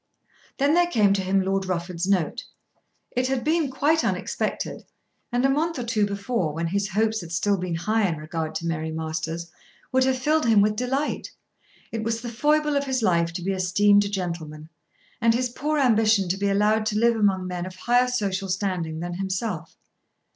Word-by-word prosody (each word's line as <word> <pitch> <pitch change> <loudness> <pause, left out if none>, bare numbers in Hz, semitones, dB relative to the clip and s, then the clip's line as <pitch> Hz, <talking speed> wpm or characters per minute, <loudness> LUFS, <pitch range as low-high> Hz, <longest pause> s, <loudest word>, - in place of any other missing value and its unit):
Then 285 +2 +3
there 350 +1 +4
came 210 - +3
to 195 - 0
him 190 +1 +1
Lord 195 0 -1
Rufford's 175 0 -2
note. 195 +4 0 0.7
It 250 +1 0
had 265 -2 -1
been 315 -1 +1
quite 305 +5 +2
unexpected, - - -2 0.5
and 245 +2 +1
a - - +6
month 310 +4 0
or 250 - -3
two 220 -3 +1
before, 200 -4 -2
when 165 +2 -2
his 200 +3 -1
hopes 220 +2 0
had 170 -1 -9
still 200 +4 +1
been 180 -2 -3
high 215 +5 +1
in 165 -3 -2
regard 155 +1 -4
to 170 - -3
Mary 160 -1 -2
Masters, 160 +1 -4 0.4
would 260 0 +3
have 260 0 +1
filled 300 +1 +1
him 220 -2 +5
with 210 +1 +3
delight. 265 +5 -2 0.6
It 225 -1 -3
was 230 0 -1
the 240 - -5
foible 300 +4 +2
of 280 0 +1
his 260 -3 -1
life 170 -4 +2
to 175 - -5
be 195 - 0
esteemed 200 +2 +3
a 200 - -3
gentleman, 165 -5 -5 0.5
and 230 0 +4
his 250 +1 0
poor 300 +5 -2
ambition 220 -7 +3
to 185 - 0
be 200 0 0
allowed 210 +2 +2
to 210 -1 0
live 235 +1 +3
among 195 -4 +2
men 180 0 -4
of 185 - -9
higher 245 +5 +2
social 195 -5 -2
standing 180 -4 -2
than 175 0 -4
himself. 185 -2 -3
205 Hz, 195 wpm, -24 LUFS, 180-245 Hz, 0.7 s, a